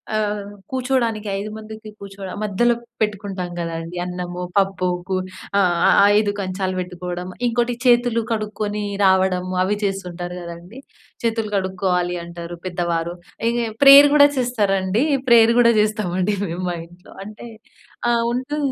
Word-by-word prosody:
ఆహ్, 210 -1 -1 0.2
కుర్చోడానికి 250 -5 -1
ఐదు 210 - -5
మందికి 220 0 -10
కూర్చో 200 0 -10 0.2
మధ్యలో 215 +3 +2 0.3
పెట్టుకుంటాం 200 -4 -2
కదండీ. 165 +1 -5
అన్నము, 180 0 -5 0.2
పప్పు, 195 -2 +1 0.2
కు 190 - -1 0.4
ఆ! - - +5 0.3
ఆహ్, - - +5 0.2
5 210 -1 +3
కంచాలు 185 -1 -2
పెట్టుకోవడం. 180 0 -5 0.2
ఇంకోటి 240 +1 0
చేతులు 240 -1 +4
కడుక్కొని 210 -1 -2 0.2
రావడం, 190 -1 +3 0.2
అవి 195 +3 +1
చేస్తుంటారు 180 -3 -4
కదండీ. 170 +7 -10 0.4
చేతులు 225 -2 -1
కడుక్కోవాలి 185 -2 0
అంటారు 170 0 -8
పెద్దవారు. 170 -2 -2 0.4
ఇంక 240 +1 -1 0.2
ప్రేయర్ 280 +1 +10
కూడా 285 -1 +8
చేస్తారండి. 205 -4 +1 0.3
ప్రేయర్ 230 -1 +7
కూడా 235 -1 +5
చేస్తామండి 210 -2 0
మేము 175 +1 -5
మా 175 - -2
ఇంట్లో. 175 +2 -17
అంటే 215 +3 -10 0.6
ఆహ్, 235 -1 +2
ఉంటు 260 +4 -3
200 Hz, 130 wpm, -21 LUFS, 180-225 Hz, 0.6 s, ప్రేయర్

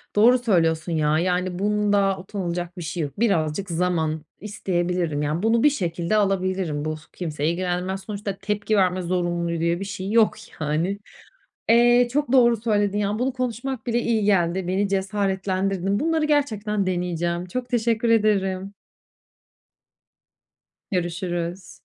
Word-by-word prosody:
Doğru 235 +5 +6
söylüyorsun 170 -7 +1
ya, 155 -1 +2
yani 180 +1 -1
bunda 205 -1 +2
utanılacak 180 -2 -4
bir - - -5
şey 170 +1 -3
yok. 145 +4 -6
Birazcık 190 -4 0
zaman 165 -3 -1 0.2
isteyebilirim, 180 -6 -1
yani 150 +5 -1
bunu 225 +1 +3
bir 295 - +7
şekilde 175 - -1
alabilirim, 185 -6 0
bu 155 0 -2 0.2
kimseyi 155 -3 -2
ilgilendirmez, 180 +2 -2
sonuçta 200 -1 -5
tepki 210 +1 -1
verme 185 -1 +2
zorunluluğu 175 -1 -1
diye 170 +1 0
bir 195 - -4
şey 195 0 -5
yok 225 -1 +4 0.3
yani. 160 +7 -1 0.7
Eee, 240 +1 +5
çok 290 -2 0
doğru 240 -3 +5
söyledin 205 -2 0
ya, 205 +1 -1
bunu 260 +2 0
konuşmak 250 0 -4
bile 235 0 +1
iyi 225 -3 +1
geldi. 185 -2 +1
Beni 195 +2 +1
cesaretlendirdin. 195 -1 -1
Bunları 320 0 +1
gerçekten 215 -9 0
deneyeceğim. 175 -1 -1
Çok 245 +7 -4
teşekkür 235 -1 +1
ederim. 200 -3 +1 2.2
Görüşürüz. 175 0 -3
190 Hz, 130 wpm, -23 LUFS, 175-215 Hz, 2.2 s, bir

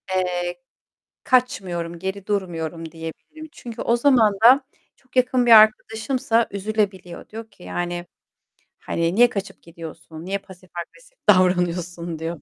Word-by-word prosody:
eee, 180 +3 -2 0.6
kaçmıyorum, 180 -9 0
geri 190 +2 -5
durmuyorum 165 -5 -3
diyebilirim. 165 - -9
Çünkü 235 -8 -8
o 235 - +2
zaman 235 -6 +4
da 255 +4 +8 0.4
çok 255 -1 -28
yakın 255 -1 +3
bir 235 - +6
arkadaşımsa 225 +2 +4
üzülebiliyor. 200 -3 -3
Diyor 225 +1 -9
ki 180 - -20
yani, 175 0 -4 0.7
hani 170 +2 -1
"Niye 240 +1 +6
kaçıp 200 -4 -6
gidiyorsun? 165 -1 -10
Niye 195 +2 -1
pasif 185 -1 -16
agresif - - -16
davranıyorsun." 175 -3 +2
diyor 165 +1 -3
bana. - - -18
190 Hz, 130 wpm, -22 LUFS, 175-230 Hz, 0.7 s, da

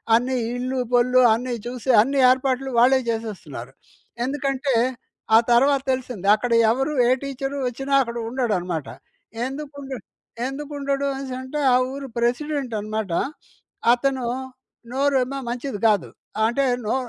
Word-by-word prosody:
అన్ని 250 +3 +1 0.2
ఇల్లు, 255 +1 -2
పొల్లు 250 +1 +4
అన్నీ 245 +2 -2
చూసి 250 +1 -6
అన్ని 275 +5 0
ఏర్పాట్లు 260 +1 +1
వాళ్ళే 260 +2 +5
చేసేస్తున్నారు. 195 - -5 0.5
ఎందుకంటే, 275 0 -1 0.6
ఆ - - +8
తర్వాత 270 +3 +4
తెల్సింది. 245 -7 -3
అక్కడ 240 +3 -3 0.2
ఎవరు 270 +5 0
ఏ - - +3
టీచర్ 275 0 -4
వచ్చినా 270 +3 -4
అక్కడ 235 -1 -6
ఉండడనమాట. 185 - -1 0.6
ఎందుకు 285 +2 -7
ఉండు 270 -1 -6 0.5
ఎందుకు 285 +2 -6
ఉండడు 280 0 -1
అనేసి 270 -1 -5
అంటే 260 +3 -5
ఆ - - +5 0.2
ఊరు 275 0 -6
ప్రెసిడెంట్ 255 +2 -1
అనమాట. 215 -3 -3 0.8
అతను 260 0 0 0.7
నోరేమో 270 0 +1
మంచిది 245 -2 -4
కాదు. 205 -5 +2 0.4
అంటే 240 +5 +1 0.2
నో 215 - 0
255 Hz, 125 wpm, -23 LUFS, 235-275 Hz, 0.8 s, ఆ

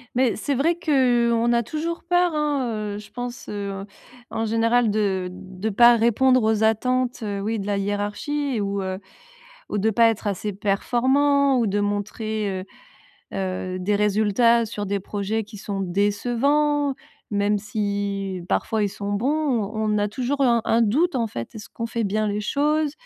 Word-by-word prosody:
Mais 250 -2 +2
c'est 280 +5 -1
vrai 325 +6 +2
que, 255 -8 +2
heu, - - +2
on 235 +1 +2
a 235 0 +3
toujours 330 +7 -4
peur 355 0 +3
hein, 290 -5 0 0.3
heu, - - -5
je 210 -1 -11
pense, 245 +1 -6
heu, 200 -1 -4 0.4
en 225 - -2
général. 230 +1 +2
De 195 -3 0
de 190 +3 -6
pas 235 +3 +6
répondre 255 +3 +3
aux 220 0 +2
attentes, 250 +3 +1
heu, 200 -2 -3
oui 220 +1 -2
de 200 - -5
la 205 - 0
hiérarchie 205 +8 -2
et 210 - 0
ou, 200 0 -2
heu 190 0 -3 0.7
ou 205 - -1
de 220 +3 +2
pas 230 +2 +5
être 220 -1 -3
assez 205 +1 -2
performant. 265 +7 +2
Ou 235 - +2
de 205 0 0
montrer, 205 -1 -2
heu - - -10 0.7
heu, 185 -1 -3
des 205 +3 +1
résultats 215 +3 +3
sur 205 -2 -5
des 200 +1 -1
projets 205 +2 -3
qui 210 -1 -12
sont 200 -1 -4
décevants. 255 +10 +1 0.4
Même 205 0 +1
si 200 -2 -3
parfois 220 -2 0
ils 205 - +2
sont 200 +1 -5
bons, 215 +6 0
on 255 -9 0 0.2
on - - +2
a 205 0 +1
toujours, 260 +5 -2
heu, 270 - +5
un 235 -2 +3
un 230 - +2
doute 275 +8 +2
en 230 -2 +1
fait. 115 - -7
Est-ce 215 0 -9
qu'on 230 - -5
fait 230 0 -2
bien 215 +2 0
les 205 0 -1
choses? 295 +5 +1
220 Hz, 185 wpm, -23 LUFS, 205-250 Hz, 0.7 s, pas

